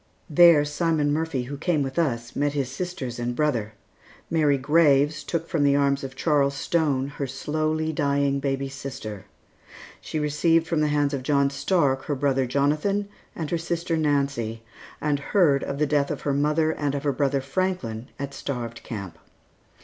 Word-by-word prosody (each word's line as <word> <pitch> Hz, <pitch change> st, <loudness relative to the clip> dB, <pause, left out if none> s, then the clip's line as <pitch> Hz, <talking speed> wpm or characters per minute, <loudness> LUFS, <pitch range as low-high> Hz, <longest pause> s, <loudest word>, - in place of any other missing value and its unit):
There 160 Hz, -1 st, +7 dB
Simon 150 Hz, -1 st, 0 dB
Murphy, 155 Hz, -4 st, -1 dB
who 140 Hz, +3 st, -6 dB
came 160 Hz, -1 st, +1 dB
with 135 Hz, +4 st, -3 dB
us, 120 Hz, -7 st, -1 dB
met 145 Hz, 0 st, 0 dB
his 135 Hz, -3 st, -2 dB
sisters 135 Hz, -6 st, -5 dB
and 120 Hz, 0 st, -2 dB
brother; 120 Hz, -8 st, 0 dB, 0.6 s
Mary 150 Hz, -4 st, +3 dB
Graves 145 Hz, +1 st, +3 dB
took 165 Hz, -1 st, -3 dB
from 155 Hz, -4 st, 0 dB
the 140 Hz, 0 st, +4 dB
arms 140 Hz, 0 st, +2 dB
of 135 Hz, -1 st, -6 dB
Charles 140 Hz, -2 st, +2 dB
Stone, 140 Hz, -3 st, 0 dB
her 140 Hz, -, -1 dB
slowly 155 Hz, +4 st, -1 dB
dying 140 Hz, -1 st, +1 dB
baby 135 Hz, 0 st, -1 dB
sister; 135 Hz, -7 st, -7 dB, 0.7 s
she -, -, -5 dB
received 155 Hz, +2 st, +2 dB
from 165 Hz, -2 st, 0 dB
the 150 Hz, -, +2 dB
hands 145 Hz, -1 st, +1 dB
of 135 Hz, -, -2 dB
John 140 Hz, 0 st, +2 dB
Stark 140 Hz, -2 st, +1 dB
her 145 Hz, -, -1 dB
brother 135 Hz, -1 st, +1 dB
Jonathan 150 Hz, +10 st, 0 dB, 0.3 s
and 160 Hz, -3 st, -4 dB
her 170 Hz, -, 0 dB
sister 170 Hz, 0 st, -2 dB
Nancy, 140 Hz, -7 st, 0 dB, 0.4 s
and 145 Hz, -1 st, 0 dB
heard 145 Hz, -3 st, +2 dB
of 140 Hz, -, -4 dB
the 150 Hz, -, +2 dB
death 140 Hz, -1 st, +1 dB
of -, -, -4 dB
her 140 Hz, -, 0 dB
mother 150 Hz, +3 st, +2 dB
and 145 Hz, -3 st, -2 dB
of 140 Hz, -, -3 dB
her 145 Hz, -2 st, +1 dB
brother 140 Hz, 0 st, +1 dB
Franklin 135 Hz, -6 st, -2 dB
at 140 Hz, 0 st, -5 dB
Starved 120 Hz, -5 st, -5 dB
Camp. 100 Hz, -6 st, -7 dB
145 Hz, 170 wpm, -25 LUFS, 135-155 Hz, 0.7 s, There